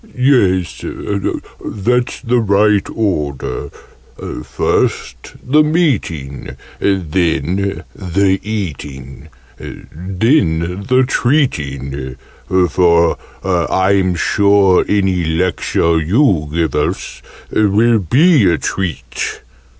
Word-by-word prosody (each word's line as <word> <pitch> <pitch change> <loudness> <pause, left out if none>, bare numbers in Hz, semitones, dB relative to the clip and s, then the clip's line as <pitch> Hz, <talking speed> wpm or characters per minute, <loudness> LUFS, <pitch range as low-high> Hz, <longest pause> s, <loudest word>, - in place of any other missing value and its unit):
"Yes, 100 -10 +2 0.8
that's 120 +4 -1
the 125 -1 +1
right 105 -1 +2
order. 75 -9 -2 0.7
First - - -2
the 150 +4 +5
Meeting: 125 - -1 0.2
then 95 +1 -1
the 95 +1 0
Eating: 75 - -6 0.3
then 90 - -1
the 130 0 +4
Treating 70 - -1 0.5
for 85 0 +3 0.3
I'm 95 +1 +1
sure 100 +1 +3
any 95 -3 +1
Lecture 85 0 0
you 85 - +2
give 80 0 -1
us 75 - -2 0.3
will 110 +2 +3
be 130 - +4
a 85 - +1
treat!" 90 -3 -4
95 Hz, 80 wpm, -16 LUFS, 80-110 Hz, 0.8 s, the